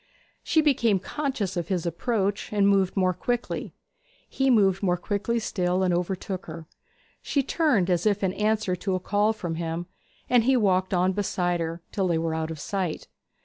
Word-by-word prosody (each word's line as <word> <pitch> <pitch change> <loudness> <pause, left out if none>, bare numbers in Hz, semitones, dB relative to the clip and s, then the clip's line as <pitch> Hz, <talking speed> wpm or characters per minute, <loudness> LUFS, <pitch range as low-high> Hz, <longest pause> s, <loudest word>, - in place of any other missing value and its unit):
She 320 - +2
became 240 -9 +3
conscious 235 -4 -3
of 170 -2 -2
his 180 -3 -1
approach, 200 +3 -1
and 205 -1 +3
moved 195 -1 +2
more 185 -1 +3
quickly. 240 +7 -3 0.5
He 270 0 0
moved 195 -6 +4
more 180 -3 +1
quickly 205 +5 -1
still, 185 -4 0
and 180 -1 +2
overtook 185 +1 -3
her. 165 - -8 0.6
She 280 - 0
turned 265 - +2
as 180 +2 +1
if 205 -1 +1
in 185 -1 +1
answer 210 -3 0
to 190 +1 -1
a - - -1
call 205 +3 +1
from 175 -7 -4
him, 165 +1 -3 0.4
and 240 -2 +4
he 265 0 +4
walked 190 -3 +2
on 180 +1 +3
beside 180 -3 -1
her, 165 +1 -4
till 195 -3 0
they 170 -2 +1
were 165 0 -1
out 160 0 -2
of 160 -2 -6
sight. 185 -1 -3
190 Hz, 185 wpm, -26 LUFS, 175-215 Hz, 0.6 s, moved